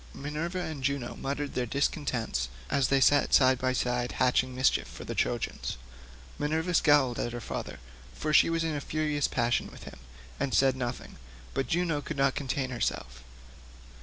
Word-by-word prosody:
Minerva 155 +5 -4
and 155 -6 -5
Juno 140 -3 -1
muttered 140 +1 -3
their 125 -1 -1
discontent 125 - -1 0.2
as 135 -2 +3
they 135 - +3
sat 145 +2 +4
side 130 -2 +5
by 130 0 +1
side 125 -1 -1
hatching 130 0 +2
mischief 130 +1 +2
for - - -9
the - - -5
Trojans. - - -2 0.6
Minerva 160 +4 0
scowled 145 -7 +4
at 120 - -2
her 120 - -4
father, 115 - -5 0.4
for 155 0 -2
she - - +6
was 165 0 0
in 160 -1 -1
a 145 - -3
furious 150 -2 0
passion 120 +1 0
with - - -13
him, - - -10 0.4
and 130 - 0
said 135 -1 +4
nothing, 125 -1 -5 0.4
but 135 0 -1
Juno 165 -3 0
could 150 - -6
not 135 0 +3
contain 130 -1 -2
herself. 65 - -3
135 Hz, 170 wpm, -29 LUFS, 125-150 Hz, 0.6 s, she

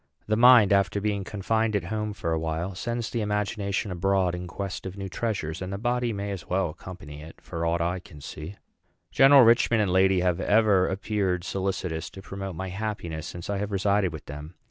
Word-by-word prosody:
The 110 - +1
mind, 120 -3 +7
after 100 0 +2
being 100 -1 -1
confined 110 +2 -1
at 100 - 0
home 105 +3 -3
for 85 -4 -3
a 80 - +1
while, 80 +4 -3
sends 120 +4 -3
the 115 - -1
imagination 105 -1 -1
abroad 95 0 +1
in 90 0 -5
quest 95 +2 -5
of 95 +1 -8
new 95 -1 -4
treasures; 95 -5 -3
and 95 0 -4
the 100 - -3
body 120 +2 0
may 100 -1 -4
as 90 -7 -6
well 90 -2 0
accompany 75 -4 -10
it, 80 +1 -12
for 85 0 -4
aught 85 +1 0
I 85 +2 -1
can 80 -4 -14
see." 75 +6 -8 0.6
General 135 0 +7
Richman 115 0 +4
and 100 -4 +1
lady 95 0 +4
have 90 -1 +1
ever 105 -3 +3
appeared 95 -2 -1
solicitous 95 -4 -3
to 95 - -11
promote 95 -2 -6
my 95 +3 -4
happiness 95 -6 -4
since 85 -1 -7
I 100 -1 -2
have 105 +1 -3
resided 100 -1 +1
with 80 -2 -9
them. 75 +4 -9
95 Hz, 205 wpm, -26 LUFS, 90-105 Hz, 0.6 s, mind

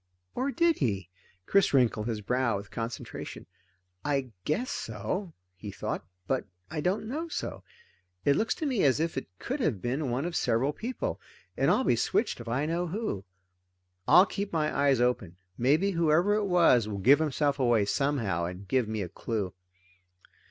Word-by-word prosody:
Or 260 +3 -1
did 335 +2 +2
he? 100 -7 -1 0.4
Chris 195 - +3
wrinkled 115 -4 +2
his 110 -3 -2
brow 125 +1 +1
with 100 -1 -9
concentration. 115 0 -6 0.6
I 135 -4 -1
guess 230 +12 0
so, 115 - -4 0.2
he 95 +3 -8
thought, 95 - -4 0.2
but 130 +4 -1 0.3
I 155 -1 -2
don't 190 +6 0
know 310 +8 -3
so. - - -5 0.6
It 140 - +5
looks 220 - +1
to 315 - -4
me 255 -8 +1
as 135 -1 +4
if 165 +1 -1
it 135 - -4
could 265 - -3
have 145 - 0
been 130 +6 -2
one 125 +5 -1
of 175 -1 -3
several 130 +6 +1
people, 255 - -4 0.3
and - - +2
I'll 260 - +3
be 120 - +3
switched 195 - 0
if 120 - -10
I 130 +6 0
know 170 +3 -1
who. 170 - -3 0.8
I'll 180 +2 +8
keep 200 0 -4
my 155 -2 0
eyes 140 -3 +3
open. 120 -8 0 0.2
Maybe 155 +11 +3
whoever 170 +3 +3
it 210 0 +1
was 170 - +4
will 105 -2 -4
give 130 +10 +6
himself 145 -2 0
away 120 -5 +3
somehow 105 -7 0
and 90 +3 -7
give 125 +1 +1
me 110 -2 -2
a - - -4
clue. 100 -2 -3
140 Hz, 175 wpm, -29 LUFS, 115-180 Hz, 0.8 s, I'll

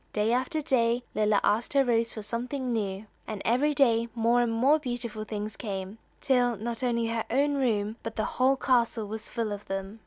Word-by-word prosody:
Day 215 +2 +1
after 260 +5 -1
day 240 -4 +2
Lilla 210 -1 +3
asked 215 +6 +1
her 275 -1 +4
rose 230 -1 +1
for 215 - -7
something 250 +3 -3
new, 200 -2 -2 0.2
and 215 -2 -4
every 280 +6 +2
day 235 -5 +3
more 235 +1 +3
and 240 -1 +1
more 265 +7 +3
beautiful 240 -5 -4
things 215 0 -5
came, 195 -1 -5 0.2
till 245 -4 +2
not 230 +3 -4
only 235 -2 +1
her 225 -1 -1
own 285 +3 +2
room, 225 -5 0
but 225 0 -6
the 215 - -1
whole 260 +2 +2
castle 240 -4 +1
was 220 +1 -6
full 230 -3 -2
of 205 0 -6
them. 195 +3 -5
230 Hz, 195 wpm, -28 LUFS, 215-250 Hz, 0.2 s, her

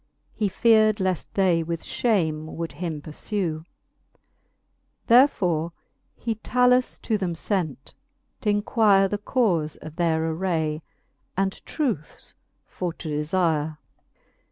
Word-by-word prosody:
He 210 -2 0
fear'd 215 +1 +4
leaft 185 -4 -1
they 185 -4 +3
with 165 0 -4
fhame 160 -10 0
would 165 +1 -5
him 155 -1 -5
purfew. 160 0 -3 1.4
Therefore 180 - +4 0.4
he 230 - -2
Talus 250 +3 +2
to 220 -3 0
them 180 -3 -1 0.2
lent, 160 -9 -2 0.5
t'inquire 205 -1 +3
The 205 +1 -3
caufe 185 - 0
of 155 +1 -10
their 165 -2 +1
aray, 160 -3 -1 0.6
and 195 0 -1
truce 230 - -3 0.3
for 180 -2 -4
to 165 - -7
delire. 155 0 0
180 Hz, 105 wpm, -25 LUFS, 160-210 Hz, 1.4 s, fear'd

